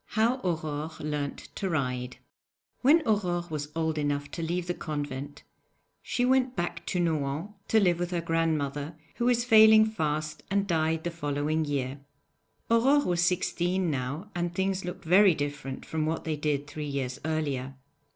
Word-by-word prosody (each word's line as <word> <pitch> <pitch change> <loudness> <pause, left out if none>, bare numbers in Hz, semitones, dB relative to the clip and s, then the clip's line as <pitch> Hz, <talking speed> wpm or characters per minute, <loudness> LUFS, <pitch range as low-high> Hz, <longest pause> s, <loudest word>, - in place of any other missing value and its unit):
HOW 230 +4 +3
AURORE 155 -3 -2
LEARNT 150 -1 -4
TO 195 - -3
RIDE 125 -5 -2 0.6
When 310 +5 +5
Aurore 180 -6 +1
was 150 -1 -4
old 160 -1 0
enough 145 -1 -1
to 170 - -5
leave 170 +2 -1
the 175 - -1
convent 145 -3 -5 0.6
she 245 - 0
went 260 0 +2
back 175 0 -3
to 180 - -1
Nohant 160 +2 -1 0.2
to 220 - +4
live 175 -4 +3
with 175 0 -1
her 175 -1 -1
grandmother, 160 -3 -1 0.2
who 235 - 0
was 240 -1 +3
failing 220 -2 +8
fast 155 -7 -2
and 200 0 +1
died 160 -3 0
the 175 - -2
following 150 0 -1
year. 140 -1 -2 0.7
Aurore 270 +6 +4
was 175 -1 +1
sixteen 180 0 +1
now, 140 +9 -4
and 175 0 -1
things 190 0 0
looked 180 -1 -6
very 185 +1 +6
different 145 -2 -4
from 155 -1 -2
what 160 +1 -2
they 160 -1 -1
did 145 -1 -1
three 150 +1 -6
years 135 -3 -3
earlier. 140 -4 -2
160 Hz, 160 wpm, -28 LUFS, 145-185 Hz, 0.7 s, failing